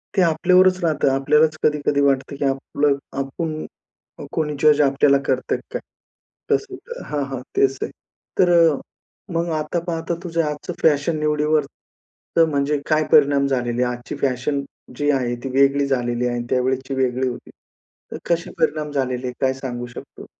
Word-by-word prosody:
ते 195 Hz, -, +4 dB
आपल्यावरच 185 Hz, +2 st, +4 dB
राहतं. 155 Hz, -4 st, +2 dB
आपल्यालाच 150 Hz, +3 st, +3 dB
कधी-कधी 145 Hz, -1 st, +2 dB
वाटतं, 140 Hz, 0 st, +1 dB
की 140 Hz, -, -1 dB
आपलं 140 Hz, +1 st, 0 dB, 0.2 s
आपण 155 Hz, +3 st, -3 dB, 0.5 s
अ, -, -, -8 dB
कोणी 150 Hz, -2 st, -1 dB
जज 150 Hz, -1 st, +5 dB
आपल्याला 140 Hz, 0 st, +4 dB
करतंय 130 Hz, -1 st, 0 dB
का -, -, -16 dB
काय? -, -, -2 dB, 0.7 s
तास -, -, +2 dB, 0.4 s
हां, 145 Hz, -1 st, -2 dB
हां, 135 Hz, -2 st, -4 dB, 0.2 s
तेच 135 Hz, 0 st, +3 dB
ते. -, -, -2 dB, 0.5 s
तर 180 Hz, -1 st, +5 dB
अ, 165 Hz, -3 st, +5 dB, 0.6 s
मग 170 Hz, +1 st, 0 dB
आता 155 Hz, +3 st, -2 dB
पाहता 165 Hz, 0 st, -2 dB
तुझं 165 Hz, -2 st, 0 dB
आजचं 150 Hz, -1 st, -4 dB
फॅशन 155 Hz, +1 st, +2 dB
निवडीवर 150 Hz, 0 st, +1 dB, 0.7 s
तर 165 Hz, -, +7 dB
म्हणजे 145 Hz, -1 st, 0 dB
काय 155 Hz, 0 st, +3 dB
परिणाम 140 Hz, -1 st, +5 dB
झालेले 125 Hz, -2 st, 0 dB
आहेत? 125 Hz, -1 st, -1 dB
आजची 120 Hz, -, -8 dB
फॅशन 140 Hz, +2 st, 0 dB, 0.4 s
जी 145 Hz, 0 st, 0 dB
आहे, 125 Hz, -3 st, 0 dB
ती 135 Hz, -, -3 dB
वेगळी 140 Hz, +1 st, +4 dB
झालेली 120 Hz, -2 st, 0 dB
आहे 120 Hz, -, -1 dB
आणि 120 Hz, -, -4 dB
त्यावेळेसची 130 Hz, +1 st, 0 dB
वेगळी 130 Hz, 0 st, 0 dB
होती. 125 Hz, -, -6 dB, 0.6 s
तर -, -, -4 dB
कसे 170 Hz, 0 st, 0 dB
परिणाम 155 Hz, -2 st, 0 dB
झालेले 130 Hz, -3 st, -2 dB
आहे, 125 Hz, -, -3 dB
काय 130 Hz, -1 st, +2 dB
सांगू 120 Hz, -2 st, -5 dB
शकतो? -, -, -10 dB
140 Hz, 165 wpm, -21 LUFS, 130-155 Hz, 0.7 s, तर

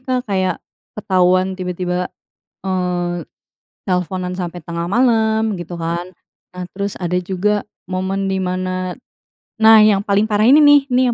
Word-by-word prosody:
Kak, 255 Hz, -1 st, -2 dB
kayak 185 Hz, -2 st, 0 dB, 0.4 s
ketahuan 185 Hz, -1 st, +2 dB
tiba-tiba, 180 Hz, -1 st, -3 dB, 0.5 s
eee, 180 Hz, -2 st, -2 dB, 0.6 s
telfonan 180 Hz, 0 st, -2 dB
sampai 175 Hz, -1 st, -5 dB
tengah 170 Hz, +2 st, -5 dB
malam, 220 Hz, 0 st, +1 dB
gitu 175 Hz, 0 st, -7 dB
kan. 170 Hz, +2 st, -3 dB, 0.4 s
Nah, 180 Hz, 0 st, -6 dB
terus 200 Hz, 0 st, -2 dB
ada 180 Hz, 0 st, -1 dB
juga 190 Hz, +3 st, -1 dB, 0.2 s
momen 190 Hz, +1 st, -2 dB
di 190 Hz, -, -1 dB
mana 185 Hz, 0 st, -2 dB, 0.6 s
nah, 220 Hz, 0 st, +7 dB
yang 205 Hz, -2 st, +4 dB
paling 205 Hz, +2 st, +1 dB
parah 210 Hz, 0 st, +1 dB
ini 275 Hz, +6 st, +7 dB
nih, 290 Hz, -1 st, +7 dB
nih 255 Hz, +1 st, +3 dB
185 Hz, 135 wpm, -18 LUFS, 180-210 Hz, 0.6 s, nah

